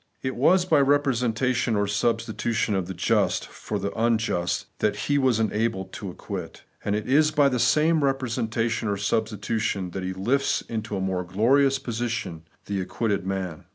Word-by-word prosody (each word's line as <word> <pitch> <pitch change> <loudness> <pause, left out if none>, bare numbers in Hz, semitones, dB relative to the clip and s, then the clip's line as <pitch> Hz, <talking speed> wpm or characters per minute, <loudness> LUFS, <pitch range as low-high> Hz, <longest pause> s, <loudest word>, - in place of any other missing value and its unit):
It 130 0 -2
was 175 +8 +4
by 160 -5 +4
representation 125 -4 +1
or 100 0 +2
substitution 110 +1 0
of 95 -3 -1
the 95 - -6
just - - +1
for 105 - -5
the 100 0 -3
unjust 110 -6 0
that - - +1
He 145 0 0
was 130 -4 +2
enabled 110 -3 -1
to 105 -6 -6
acquit; 90 - -7 0.2
and 100 - 0
it 105 0 -3
is 150 +4 +4
by 145 -2 +3
the 125 -2 -1
same 155 +4 +3
representation 120 -4 -1
or 100 -1 0
substitution 105 -2 -1
that 95 - -4
He 95 0 -3
lifts 125 +9 +1
into 110 -2 -4
a - - -2
more 95 -1 -1
glorious 130 +10 +3
position 115 -10 -4 0.2
the 100 -2 -2
acquitted 100 0 -2
man. 95 -4 -4
115 Hz, 165 wpm, -25 LUFS, 100-130 Hz, 0.2 s, was